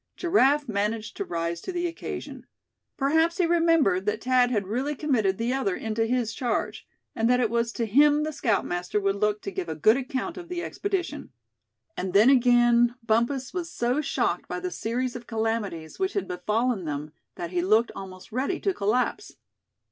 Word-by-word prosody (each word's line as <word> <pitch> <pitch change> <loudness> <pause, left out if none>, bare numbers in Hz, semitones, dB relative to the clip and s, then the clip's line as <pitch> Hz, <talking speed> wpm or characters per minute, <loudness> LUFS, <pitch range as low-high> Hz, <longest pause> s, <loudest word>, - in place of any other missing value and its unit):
Giraffe 295 -5 +3
managed 215 +1 -2
to - - -1
rise 170 0 -3
to - - -5
the 350 -1 -2
occasion. 335 0 -6 0.5
Perhaps 320 +5 +2
he 360 - +3
remembered 330 - +3
that 210 +1 -1
Thad 250 0 +3
had 210 -5 0
really 260 +9 -2
committed 230 -10 +1
the 235 +2 -1
other 235 -9 0
into 225 0 -1
his 240 -2 0
charge; 245 +1 -2 0.3
and 225 +1 +1
that 250 0 +4
it 230 -3 +1
was 235 0 0
to 230 - -1
him 290 +7 +4
the 310 0 -3
scoutmaster 195 -6 0
would 195 -1 0
look 210 0 0
to 195 - -4
give 185 -3 -4
a 160 - -3
good 215 - +4
account 270 +6 -4
of 350 -1 -9
the 350 -1 -3
expedition. 390 -3 -3 0.7
And 185 0 -4
then 215 +6 +6
again, 240 -2 +4
Bumpus 235 +4 0
was 345 -2 -4
so 245 +5 0
shocked 300 - -1
by - - -4
the 365 0 -4
series 245 0 -2
of 245 -1 -8
calamities 220 -8 -3
which 380 +1 0
had 400 - -2
befallen 210 +3 -1
them 150 0 -4 0.2
that 170 -1 -5
he 180 -1 0
looked 215 +6 +3
almost 185 +2 -9
ready 270 +10 -1
to 390 - 0
collapse. 250 - -1
235 Hz, 185 wpm, -26 LUFS, 205-285 Hz, 0.7 s, then